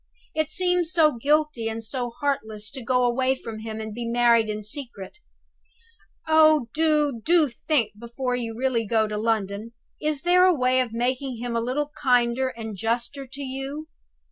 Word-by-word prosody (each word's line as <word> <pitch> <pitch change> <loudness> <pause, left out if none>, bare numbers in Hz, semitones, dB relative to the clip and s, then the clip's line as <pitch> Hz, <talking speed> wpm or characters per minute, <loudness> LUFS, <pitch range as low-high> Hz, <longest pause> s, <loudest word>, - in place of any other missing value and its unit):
"It 310 -1 0
seems 360 -1 +1
so 320 -4 +4
guilty 290 -1 +1
and 225 0 -5
so 245 +2 -3
heartless 230 -5 -3
to 260 - -6
go 250 +1 +2
away 255 +2 +2
from 225 -4 -8
him 220 0 -6
and 220 -1 -6
be 240 +2 -5
married 235 -2 +3
in 215 0 -4
secret. 235 - -6 1.1
Oh, 310 -5 +5
do, 300 -6 +1
do 330 -2 +4
think 235 -3 0
before 245 +2 -3
you 230 -2 -4
really 245 -3 0
go 220 0 +2
to 210 - -4
London; 215 0 -1 0.3
is 300 -2 -1
there 360 +1 +5
no 365 - +4
way 255 -1 +2
of 250 -3 0
making 250 +2 -2
him 240 0 -4
a 230 - +1
little 285 +5 -2
kinder 250 -1 +3
and 225 -4 -6
juster 235 +6 -2
to 275 +3 -7
you?" 270 +4 -5
250 Hz, 170 wpm, -25 LUFS, 230-290 Hz, 1.1 s, Oh